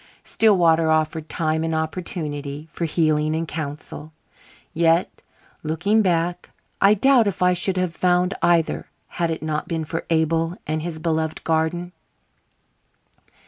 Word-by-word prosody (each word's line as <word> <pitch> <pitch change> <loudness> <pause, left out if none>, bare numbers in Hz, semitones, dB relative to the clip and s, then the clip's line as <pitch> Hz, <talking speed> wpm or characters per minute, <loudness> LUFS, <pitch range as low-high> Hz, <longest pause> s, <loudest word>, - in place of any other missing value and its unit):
Stillwater 170 -7 +3
offered 155 0 0
time 160 -1 -1
and 165 0 -1
opportunity 155 -3 -4
for 170 - -3
healing 155 -1 +1
and 165 +1 -2
counsel. 155 0 -6 0.6
Yet, 165 +1 +1 0.4
looking 175 +8 +1
back, 175 -2 0 0.3
I 200 +2 +6
doubt 245 +1 +4
if 190 -2 -1
I 180 0 +4
should 185 +1 +1
have 180 -2 -1
found 180 +1 +2
either 170 -2 +1 0.2
had 170 -1 -2
it 160 -1 -4
not 155 -1 -2
been 160 -1 -2
for 165 +1 -5
Abel 165 +1 +1
and 155 +1 -2
his 165 0 -5
beloved 160 -1 -2
garden. 165 +2 -1
165 Hz, 135 wpm, -22 LUFS, 155-175 Hz, 0.6 s, I